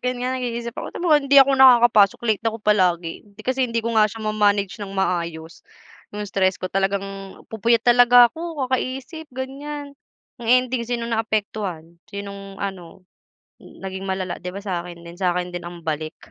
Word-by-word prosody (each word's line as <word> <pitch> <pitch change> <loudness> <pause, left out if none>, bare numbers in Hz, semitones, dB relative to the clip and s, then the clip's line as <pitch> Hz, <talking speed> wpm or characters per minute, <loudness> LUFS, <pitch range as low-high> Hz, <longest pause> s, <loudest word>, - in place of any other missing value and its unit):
ganiyan 250 +1 -2
nag-iisip 235 -1 -4
ako, - - -6 0.3
hindi 280 0 +2
ako 275 0 +8
nakakapasok. 240 -6 +6
Late 220 -1 0
ako 225 - -5
palagi 180 -5 +2 0.3
kasi 260 0 0
hindi 230 0 -1
ko 230 - -1
nga 215 -1 +5
siya 220 +1 -8
ma-manage 205 -1 +1
ng 200 -1 -6
maayos, 170 -3 -2 0.5
yung 210 0 -4
stress 190 -2 0
ko - - -4
talagang 195 +1 0 0.5
pupuyat 230 +1 +1
talaga 245 0 +7
ako 325 -4 -4
kakaisip, 260 +5 -3
ganiyan. 285 +3 -6 0.5
Ang 230 - -6 0.2
ending 245 -2 -4
sinong 235 -1 -3
naaapektuhan, 200 -7 -3
sinong 200 -1 -8
ano, 190 -2 -7 0.6
naging 190 0 -8
malala, 190 -2 -3
'di 180 - -5
ba, - - -5
sa 185 -4 -2
akin 170 -1 -11
din? 170 0 -11
Sa 180 -2 +1
akin 180 0 -3
din 175 0 -6
ang 175 -1 -12
balik? 155 0 -3
210 Hz, 160 wpm, -22 LUFS, 185-245 Hz, 0.6 s, ako